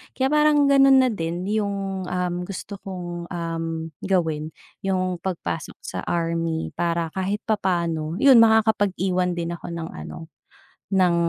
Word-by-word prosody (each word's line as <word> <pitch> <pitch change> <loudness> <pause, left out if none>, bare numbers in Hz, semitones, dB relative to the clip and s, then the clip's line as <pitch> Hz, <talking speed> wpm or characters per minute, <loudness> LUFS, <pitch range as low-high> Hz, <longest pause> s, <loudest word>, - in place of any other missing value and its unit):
Kaya 265 - +1
parang 300 -2 +4
ganun 270 -1 +7
na 255 - +2
din 170 -3 -3
yung, 195 -3 -2
uhm, 180 0 -2
gusto 200 +1 -7
kong, 175 -3 -6
uhm, 165 -2 -4 0.2
gawin 160 -5 0 0.2
yung 185 -2 -1
pagpasok 165 - -4
sa - - -5
army 165 -1 -1
para 170 -1 -1
kahit 190 +3 -2
papaano, 170 -6 -1
'yun 270 -4 +8
makakapag-iwan 200 -5 +3
din 170 0 -3
ako 170 - -7
ng 170 -1 -5
ano, 160 -1 -9 0.6
ng 185 -3 +3
180 Hz, 135 wpm, -23 LUFS, 170-200 Hz, 0.6 s, yun